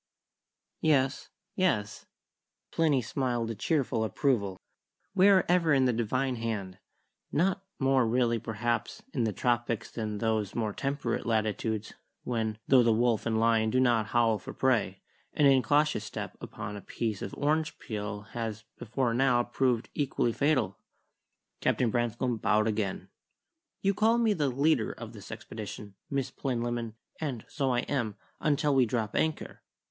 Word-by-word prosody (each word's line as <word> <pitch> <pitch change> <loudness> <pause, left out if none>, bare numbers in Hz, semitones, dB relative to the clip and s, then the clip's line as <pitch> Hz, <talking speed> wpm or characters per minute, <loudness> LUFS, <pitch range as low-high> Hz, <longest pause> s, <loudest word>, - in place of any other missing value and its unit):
'" - - -56
"Yes 135 0 -1 0.2
yes" 115 - 0 0.6
Plinny 150 -6 +2
smiled 120 -1 -1
a - - -2
cheerful 125 - 0
approval 105 -3 0 0.6
"we 190 +1 +5
are 190 -2 +5
ever 170 -4 +4
in 130 -1 +4
the 125 - +3
Divine 125 +3 0
Hand; 100 -5 -4 0.5
not 190 +4 +1
more 135 -3 +3
really, 115 0 +2
perhaps, 115 +1 -2
in 120 -4 +1
the 110 - 0
tropics 120 +1 -1
than 110 -2 -3
in - - -4
those 110 -2 -1
more 110 -3 -1
temperate 135 -4 -2
latitudes 110 -1 -1 0.3
when, 110 -3 -2
though 130 -2 +7
the 115 -1 +4
wolf 115 0 +2
and 110 -1 +1
lion 115 -1 +3
do 130 - +2
not 120 -4 +3
howl 115 -1 +2
for - - -9
prey, 115 -8 +1 0.3
an 150 - +3
incautious 140 -1 +3
step - - -6
upon 100 - -6
a 100 - -7
piece 110 -2 -3
of 95 - -5
orange 155 +2 0
peel 105 -2 -5
has 110 -2 -4 0.2
before 120 +2 -1
now 125 -1 +3
proved 120 -1 0
equally 130 -4 0
fatal." 130 -10 +1 0.8
Captain 120 -3 +1
Branscome 120 +1 0
bowed 110 0 +2
again. 105 -3 -2 0.7
"You 195 0 +3
call 220 +4 +3
me 230 -3 +3
the 150 -7 0
leader 135 -2 +2
of - - -9
this - - -11
expedition, 105 -2 -7 0.2
Miss 135 -2 -1
Plinlimmon; 120 -3 -2 0.2
and 135 -8 -4
so 140 -3 -1
I 120 -1 +2
am, 120 -8 -2 0.2
until 150 -1 +2
we 130 -3 +4
drop 110 -2 -2
anchor. 160 -1 -1
120 Hz, 150 wpm, -29 LUFS, 110-135 Hz, 0.8 s, though